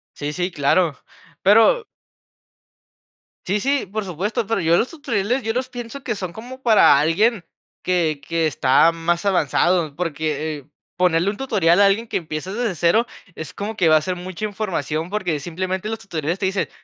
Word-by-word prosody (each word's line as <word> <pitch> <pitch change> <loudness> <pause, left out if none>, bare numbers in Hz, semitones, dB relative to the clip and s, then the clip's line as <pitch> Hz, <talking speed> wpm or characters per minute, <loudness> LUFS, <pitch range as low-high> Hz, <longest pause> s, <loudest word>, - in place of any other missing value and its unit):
Sí, 145 0 -4
sí, 180 +3 -2
claro. 160 0 +1 0.5
Pero 225 - +5 1.6
Sí 200 +3 0
sí, 275 +1 0
por 210 +3 -4
supuesto, 195 +5 -2
pero, 225 -1 0
yo 165 0 +3
los 235 - +1
tutoriales 250 - -1
yo 225 0 -1
los 255 +2 -2
pienso 245 +2 -8
que 240 - -2
son 185 -4 -5
como 250 +6 -10
para 220 - +6
alguien 180 +7 +2 0.4
que 165 -5 0
que 165 -1 0
está 145 +2 +4
más 170 +2 -1
avanzado, 175 -3 +1
porque, 155 -3 -3 0.3
ponerle 180 +1 +2
un 205 - -6
tutorial 205 -9 +2
a 200 - +7
alguien 215 +4 +1
que - - -3
empieza 160 +2 -4
desde 230 -2 -1
0, 175 +9 +2 0.3
es 160 - -6
como 215 +2 -5
que 180 -6 +3
va 155 - +6
a 155 - +2
ser 180 +3 -3
mucha 185 +3 -6
información, 175 -7 -3
porque, 180 -7 -2
simplemente 185 +5 -3
los 225 0 -3
tutoriales 170 -2 -3
te 195 - -1
dicen: 190 0 -1
185 Hz, 175 wpm, -21 LUFS, 165-215 Hz, 1.6 s, a